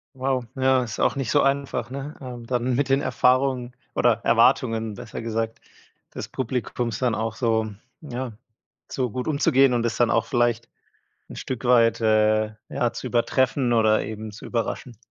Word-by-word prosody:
Wow, 130 Hz, -1 st, -1 dB
ja, 130 Hz, -1 st, +3 dB
ist 115 Hz, -2 st, -6 dB
auch -, -, +2 dB
nicht 135 Hz, -4 st, -2 dB
so 145 Hz, -, +4 dB
einfach, 135 Hz, -3 st, -1 dB
ne? 140 Hz, +3 st, -6 dB
Ähm, 125 Hz, -3 st, -8 dB
dann 125 Hz, 0 st, 0 dB
mit 140 Hz, +1 st, 0 dB
den 135 Hz, +1 st, +3 dB
Erfahrungen, 130 Hz, -1 st, +1 dB, 0.2 s
oder 120 Hz, -1 st, +4 dB
Erwartungen 115 Hz, -2 st, +3 dB
besser -, -, -7 dB
gesagt, 115 Hz, 0 st, -3 dB, 0.5 s
des -, -, -5 dB
Publikums 120 Hz, -2 st, -3 dB
dann 125 Hz, -3 st, +1 dB
auch 110 Hz, 0 st, -2 dB
so 110 Hz, -2 st, 0 dB, 0.3 s
ja, 130 Hz, -4 st, -5 dB, 0.6 s
so 125 Hz, -4 st, -2 dB
gut 125 Hz, +2 st, -4 dB
umzugehen 140 Hz, -4 st, +3 dB
und 120 Hz, -1 st, +1 dB
es 115 Hz, -, -1 dB
dann 120 Hz, -2 st, +3 dB
auch 115 Hz, -, +2 dB
vielleicht 120 Hz, -2 st, 0 dB, 0.6 s
'n -, -, -8 dB
Stück 130 Hz, -1 st, -5 dB
weit, 115 Hz, -2 st, +4 dB
äh, 110 Hz, -1 st, +2 dB
ja, 120 Hz, -1 st, -1 dB
zu -, -, -6 dB
übertreffen 125 Hz, +1 st, +1 dB
oder 110 Hz, -2 st, +3 dB
eben 110 Hz, 0 st, -6 dB
zu 105 Hz, -, -10 dB
überraschen. 120 Hz, 0 st, -3 dB
120 Hz, 165 wpm, -24 LUFS, 115-130 Hz, 0.6 s, so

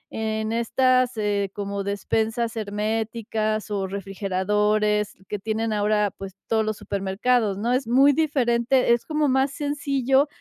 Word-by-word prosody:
en 220 Hz, 0 st, -2 dB
estas, 255 Hz, +1 st, +2 dB
eh, 205 Hz, -2 st, 0 dB
como 200 Hz, -1 st, -3 dB
despensas 220 Hz, +4 st, -1 dB
herméticas 215 Hz, 0 st, -2 dB
o 195 Hz, -2 st, -1 dB
refrigeradores 210 Hz, +2 st, 0 dB
que 210 Hz, -, -3 dB
tienen 220 Hz, +2 st, -2 dB
ahora, 210 Hz, -1 st, +1 dB
pues, 195 Hz, -1 st, -8 dB
todos 220 Hz, -1 st, +2 dB
los 215 Hz, -1 st, -2 dB
supermercados, 200 Hz, +2 st, 0 dB
¿no? 230 Hz, +4 st, -1 dB
Es 255 Hz, -2 st, 0 dB
muy 270 Hz, +4 st, +5 dB
diferente, 255 Hz, -4 st, +2 dB
es 235 Hz, -, -1 dB
como 305 Hz, -1 st, 0 dB
más 265 Hz, +1 st, +2 dB
sencillo, 280 Hz, -2 st, +1 dB
220 Hz, 135 wpm, -24 LUFS, 205-250 Hz, -, muy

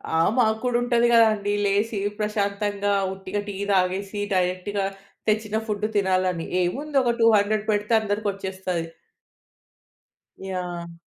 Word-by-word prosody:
ఆ! -, -, +3 dB, 0.2 s
మాకు 220 Hz, -3 st, +3 dB
కూడా 245 Hz, -1 st, +1 dB
ఉంటది 240 Hz, -1 st, +3 dB
కదండీ. 215 Hz, -3 st, +4 dB
లేసి 205 Hz, +1 st, +1 dB, 0.2 s
ప్రశాంతంగా 205 Hz, -1 st, -1 dB, 0.2 s
ఉట్టిగా 190 Hz, +1 st, -4 dB
టీ 205 Hz, -, -5 dB, 0.2 s
తాగేసి 195 Hz, +2 st, 0 dB
డైరెక్ట్‌గా 185 Hz, +2 st, 0 dB, 0.4 s
తెచ్చిన 215 Hz, 0 st, 0 dB
ఫుడ్ 210 Hz, 0 st, -1 dB
తినాలని. 185 Hz, -3 st, +1 dB, 0.2 s
ఏముంది 275 Hz, +10 st, 0 dB
ఒక 240 Hz, -1 st, +2 dB
200 215 Hz, -1 st, +4 dB
పెడితే 210 Hz, +2 st, 0 dB
అందరికి 210 Hz, 0 st, -2 dB
వచ్చేస్తది. 190 Hz, -3 st, -4 dB, 1.6 s
యాహ్! 175 Hz, -3 st, -5 dB
205 Hz, 115 wpm, -24 LUFS, 190-215 Hz, 1.6 s, కదండీ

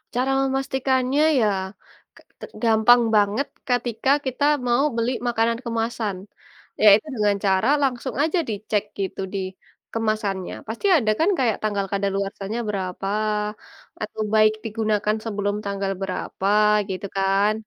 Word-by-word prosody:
Cara 255 Hz, +2 st, +1 dB, 0.2 s
memastikannya 265 Hz, +1 st, 0 dB, 0.2 s
ya 220 Hz, -, +3 dB, 0.7 s
ke -, -, -17 dB, 0.2 s
te -, -, -7 dB, 0.2 s
gampang 230 Hz, +2 st, +5 dB
banget, 210 Hz, +7 st, +2 dB, 0.2 s
ketika 245 Hz, -1 st, -1 dB, 0.2 s
kita 260 Hz, +2 st, -2 dB, 0.2 s
mau 240 Hz, +3 st, +3 dB
beli 230 Hz, +1 st, 0 dB, 0.2 s
makanan 230 Hz, 0 st, +1 dB
kemasan, 225 Hz, -3 st, -2 dB, 0.6 s
yaitu 210 Hz, 0 st, +7 dB
dengan 210 Hz, -2 st, +2 dB
cara 190 Hz, +3 st, +2 dB, 0.2 s
langsung 260 Hz, -1 st, -1 dB
aja 320 Hz, +3 st, +1 dB
dicek 210 Hz, -1 st, -1 dB, 0.2 s
gitu 195 Hz, 0 st, -3 dB
di 200 Hz, -, -1 dB, 0.5 s
kemasannya, 215 Hz, -4 st, -2 dB
pasti 230 Hz, -, -5 dB
ada 220 Hz, -7 st, +1 dB
kan 330 Hz, -, +3 dB
kayak 235 Hz, -5 st, +1 dB
tanggal 205 Hz, -2 st, 0 dB
kadaluarsanya 200 Hz, +2 st, -2 dB
berapa 190 Hz, -1 st, -3 dB, 0.9 s
atau 215 Hz, 0 st, -4 dB
baik 215 Hz, 0 st, +5 dB
digunakan 215 Hz, -1 st, 0 dB
sebelum 205 Hz, -2 st, -1 dB
tanggal 200 Hz, -1 st, -2 dB
berapa 190 Hz, 0 st, -3 dB, 0.4 s
gitu 190 Hz, +1 st, -4 dB
kan. 195 Hz, +2 st, +2 dB
215 Hz, 125 wpm, -23 LUFS, 200-240 Hz, 0.9 s, yaitu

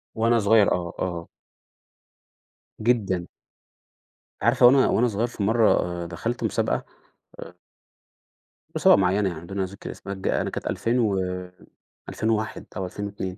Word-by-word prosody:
وأنا 115 Hz, +1 st, +3 dB
صغير 105 Hz, 0 st, +4 dB
آه، 85 Hz, -1 st, -3 dB
آه. 85 Hz, -2 st, -3 dB, 1.5 s
جدًا. 100 Hz, -7 st, +1 dB, 1.1 s
عارفة 120 Hz, +3 st, +4 dB
وأنا 130 Hz, +2 st, +6 dB
وأنا 125 Hz, -, +2 dB
صغير 115 Hz, +1 st, -1 dB
في 115 Hz, -4 st, -5 dB
مرّة 100 Hz, -5 st, +2 dB
دخلت 115 Hz, +9 st, -4 dB
مسابقة -, -, -1 dB, 0.6 s
آآ -, -, -9 dB, 1.2 s
مسابقة -, -, +6 dB
معيّنة 95 Hz, +1 st, +2 dB
يعني 80 Hz, -3 st, -7 dB
بدون 95 Hz, +2 st, -3 dB
ذِكر 95 Hz, +2 st, -8 dB
اسمها 100 Hz, -, -7 dB
ج 95 Hz, -, -5 dB
أنا -, -, 0 dB
كانت -, -, -5 dB
2000 120 Hz, +2 st, 0 dB
و2001 95 Hz, +2 st, -3 dB
أو 95 Hz, -, -2 dB
2002 100 Hz, -1 st, -5 dB
100 Hz, 120 wpm, -24 LUFS, 90-115 Hz, 1.5 s, وأنا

